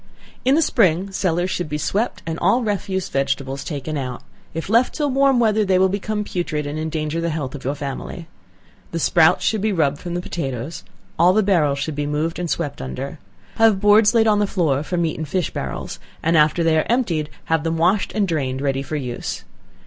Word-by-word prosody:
In 265 +2 +4
the 325 - +4
spring, 195 - +2
cellars 180 -1 0
should 175 -4 -2
be 150 - -2
swept, 210 +9 -1
and 165 0 -3
all 215 +8 +3
refuse 195 -3 -2
vegetables 135 0 -2
taken 150 -1 -4
out; 125 -2 -5 0.3
if 165 0 -5
left 230 +5 +3
till 295 -3 0
warm 270 -1 +3
weather, 220 -2 +3
they 190 -2 +2
will 190 +1 +4
become 210 +2 -2
putrid, 165 -6 -3
and 145 +2 -4
endanger 155 0 -2
the 170 - 0
health 150 -5 -3
of 145 - -8
your 140 +3 -1
family. 145 +4 -6 0.7
The - - -1
sprouts 160 0 +4
should 220 -3 +1
be 215 +1 +1
rubbed 150 -6 +1
from 175 -1 -5
the - - 0
potatoes; 135 -4 -5 0.4
all 175 +2 +6
the 215 +2 +3
barrels 160 -8 +2
should 145 +3 -3
be 145 0 -2
moved 155 +3 -1
and 175 -1 -3
swept 150 - -2
under. 135 - -6 0.4
Have 225 -3 +5
boards 210 +2 +5
laid 225 -1 +5
on 210 -2 +3
the 205 - +2
floor 155 -9 +1
for 165 +4 -3
meat 165 -3 -1
and 155 - -3
fish 180 +2 -1
barrels, 65 - -5 0.2
and 165 +1 +2
after 155 +2 +4
they 160 -1 +3
are - - -1
emptied, 175 -12 0
have 160 -2 0
them 165 0 -1
washed 180 +5 +2
and 205 -2 +2
drained 135 -6 -1
ready 135 -1 0
for 145 +3 -5
use. 125 -5 -4
165 Hz, 210 wpm, -21 LUFS, 150-200 Hz, 0.7 s, all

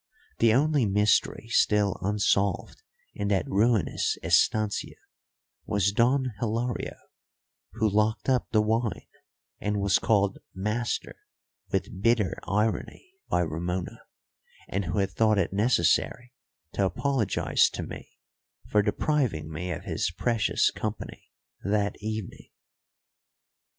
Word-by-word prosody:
The 115 -1 +5
only 140 0 +3
mystery 105 +2 +2
still 105 -5 +2
unsolved 100 - 0 0.3
in 100 - -3
that 100 -2 +1
ruinous 110 +1 +1
estancia 105 -2 +1 0.7
was 100 -1 +2
Don 125 +4 +2
Hilario, 115 +2 -2 0.8
who 110 - +1
locked 105 +2 +1
up 130 -2 +2
the 110 -1 +3
wine 110 +1 -1 0.5
and 105 0 -1
was 100 -1 +3
called 100 -4 +1 0.2
master 105 +5 -2 0.5
with 95 - -2
bitter 115 -4 +2
irony 110 - -2 0.2
by 90 - +2
Ramona, 85 +2 -3 0.7
and 100 0 -2
who 85 +3 -3
had 95 -1 +1
thought 110 -2 +2
it 95 -1 0
necessary 120 +3 +1 0.4
to 100 - 0
apologise 130 +1 +1
to - - -5
me - - -10 0.5
for 105 - +4
depriving 105 - 0
me 85 +4 -4
of 85 - -4
his - - -1
precious 105 +3 +1
company 110 0 -6 0.3
that 100 +1 0
evening. 110 -1 -5
105 Hz, 115 wpm, -27 LUFS, 100-115 Hz, 0.8 s, The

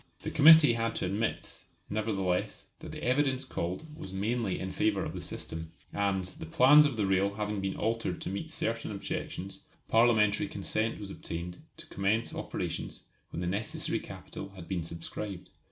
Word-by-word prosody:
The - - -3
Committee 155 -3 +9
had 115 0 -1
to - - -1
admit, 100 +5 -2 0.3
nevertheless, 100 -4 -1
that - - -8
the - - -7
evidence 130 +1 +2
called 90 - -3
was 95 - -8
mainly 105 +1 -1
in 95 0 -3
favour 105 0 +1
of - - -4
the - - -5
system; 80 0 -6 0.2
and, 100 -2 +1
the 90 -3 -7
plans 145 - +7
of 130 -5 -4
the 105 - +2
rail 95 +1 +2
having 105 -1 -2
been 95 0 -2
altered 110 -5 -1
to - - -3
meet 130 +12 -4
certain 115 -7 -2
objections, 100 -1 -5 0.2
Parliamentary 110 -3 +4
consent 110 +1 -1
was 100 -2 -7
obtained 85 0 -5 0.2
to - - -5
commence 105 +4 0
operations - - -4 0.3
when 85 - -5
the - - -1
necessary 100 +5 -1
capital 100 - -8
had 90 -3 -9
been 90 -3 -1
subscribed. 85 +4 -6
100 Hz, 170 wpm, -31 LUFS, 95-115 Hz, 0.3 s, Committee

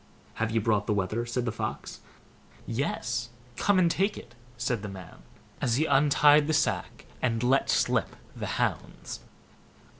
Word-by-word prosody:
"Have 115 - +1
you 115 0 +1
brought 105 -2 +1
the 105 - +1
wether?" 105 +5 -1
said 120 +1 -2
the 115 - 0
Fox. 110 0 -5 0.7
"Yes, 120 -1 -2 0.3
come 205 +8 +2
and 175 -2 +4
take 195 +4 0
it", - - -11 0.2
said 120 -2 -1
the 105 - -5
man, 95 -3 -10 0.4
as 120 -3 +2
he 155 +5 +2
untied 145 0 +5
the 155 - +1
sack 155 0 -1 0.2
and 115 -2 0
let 135 +2 +2
slip - - +1 0.2
the - - -4
hounds. - - -3
120 Hz, 155 wpm, -28 LUFS, 110-145 Hz, 0.7 s, untied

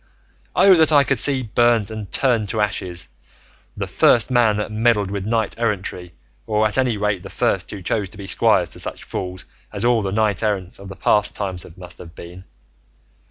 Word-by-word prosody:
Oh 195 - +6
that 160 -1 +5
I 145 -2 +6
could 135 -3 0
see 135 0 +2
burnt 115 -2 +2
and 110 -2 -7
turned 115 -6 +1
to 110 - -2
ashes 90 -7 -2 0.7
the - - -2
first 120 +2 +3
man 115 -4 +3
that 105 +1 -3
meddled 110 -3 +1
with 100 0 -4
knight 110 -1 -1
errantry 95 -6 -3 0.3
or 105 0 +1
at 110 - +1
any 125 -4 +1
rate 100 -2 -1
the 95 - -10
first 95 -2 -1
who 100 -3 -8
chose 100 +2 -1
to 100 - -14
be 100 - -8
squire - - +3
to - - -7
such - - -4
fools 95 0 -6 0.3
as 105 +2 -3
all 120 -2 +3
the 95 -1 -3
knights 105 -2 0
errant 100 -4 -2
of 100 0 -10
past 105 0 +2
times 95 -3 -4
must 90 -1 -11
have 85 0 -12
been! 90 +2 -11
105 Hz, 195 wpm, -20 LUFS, 95-115 Hz, 0.7 s, Oh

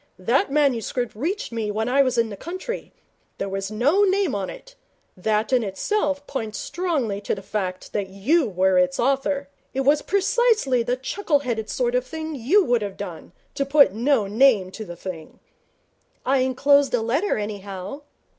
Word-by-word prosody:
That 235 +9 +1
manuscript 250 -5 +1
reached 335 - -3
me 225 -2 -2
when 220 +2 -1
I 270 +3 +4
was 255 -2 +1
in 230 -1 +2
the 205 - -6
country. 370 - -6 0.5
There 195 - -3
was 195 0 -3
no 265 - +2
name 390 -5 +2
on 195 -2 -2
it. - - -11 0.4
That 215 +5 0
in 250 - +4
itself 285 - -1
points 220 -7 -4
strongly 280 - -2
to 205 - -1
the 195 - -9
fact 190 -2 -4
that 200 -2 -2
you 245 - +1
were 185 0 +3
its 180 0 +1
author. 275 +2 +1 0.3
It 270 - +1
was 290 +3 +3
precisely 400 - +2
the 245 +2 0
chuckle 290 +2 0
headed 225 -5 -3
sort 240 +4 0
of 250 0 +2
thing 315 +3 -6
you 305 - +3
would 240 -4 +2
have 200 -2 -5
done, 180 -5 -7 0.2
to 280 - 0
put 275 -7 +5
no 240 0 +2
name 210 -3 +3
on 215 - -6
the 175 - -7
thing.' 170 -3 -8 0.9
'I 270 +2 +3
enclosed 270 +1 +3
a 235 - 0
letter, 275 - 0
anyhow.' 205 +3 -6
245 Hz, 175 wpm, -23 LUFS, 205-285 Hz, 0.9 s, put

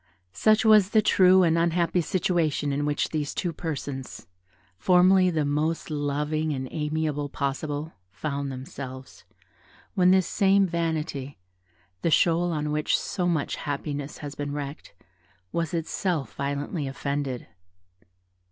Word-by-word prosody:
Such 215 - +3
was 210 -3 +6
the 215 0 +4
true 185 -2 +6
and 165 -1 +3
unhappy 170 +1 +2
situation 165 -5 0
in 145 +1 -1
which 145 - 0
these 150 -2 -3
two 175 -3 -2
persons, 140 -5 -5 0.5
formerly 185 - +5
the 155 -4 0
most 155 +3 -1
loving 150 +1 -1
and 130 -1 -4
amiable 150 -1 -2
possible, 145 +3 -3 0.2
found 140 - -4
themselves, 130 -1 -8 0.7
when 180 -1 +4
this 185 -1 +5
same 195 +1 +3
vanity, 160 -5 -3 0.6
the - - +1
shoal 170 +2 +3
on 150 -2 -2
which 150 0 +1
so 180 -3 -2
much 160 -5 0
happiness 145 0 -4
has 145 - -6
been 145 0 -4
wrecked, 145 0 -6 0.6
was 165 -2 -1
itself 165 - -2
violently 140 +2 -3
offended. 140 -2 -3
155 Hz, 125 wpm, -26 LUFS, 145-175 Hz, 0.7 s, was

